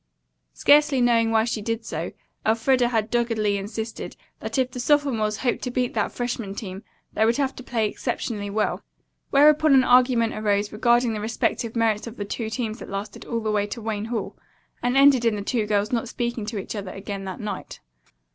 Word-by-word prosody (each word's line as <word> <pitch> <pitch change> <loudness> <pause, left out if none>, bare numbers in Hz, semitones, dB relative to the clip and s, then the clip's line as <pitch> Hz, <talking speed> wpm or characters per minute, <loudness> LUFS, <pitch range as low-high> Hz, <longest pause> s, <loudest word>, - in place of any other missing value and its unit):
Scarcely 290 -2 +5
knowing 235 -2 +3
why 220 -1 +3
she 230 -2 -2
did 225 +1 -3
so, 165 -3 -4 0.3
Elfreda 240 +3 +3
had 225 -2 -1
doggedly 230 -4 +1
insisted 220 +3 -5 0.2
that - - -4
if 260 -1 +1
the 250 - -6
sophomores 245 -6 +1
hoped 245 +2 -1
to 250 - -3
beat 250 0 -1
that 215 -2 0
freshman 240 -5 -4
team, 195 -2 -6 0.3
they - - +2
would 230 +2 +3
have 275 -2 0
to - - -7
play 225 -3 0
exceptionally 205 0 -3
well. 215 +1 -1 0.5
Whereupon 300 +1 +5
an 260 - +6
argument 245 -2 +4
arose 205 -1 0
regarding 235 +2 +2
the 210 - -4
respective 225 +1 -1
merits 225 -1 +1
of 230 - -9
the 205 - -3
two 220 +2 -4
teams 225 0 -3
that - - -9
lasted 200 +2 -6
all 230 -1 -2
the 215 -1 -1
way 205 -1 +1
to 210 - -6
Wayne 215 -2 -3
Hall, 230 0 -4 0.5
and 245 +2 +1
ended 275 -3 +6
in 230 -2 +2
the 205 - -4
two 215 0 -1
girls 210 0 +1
not 235 -1 -1
speaking 235 -3 -3
to 220 -1 -4
each 195 - -5
other 200 -2 -5
again 195 0 -6
that 190 -1 -6
night. 205 -3 -6
225 Hz, 200 wpm, -24 LUFS, 210-245 Hz, 0.5 s, an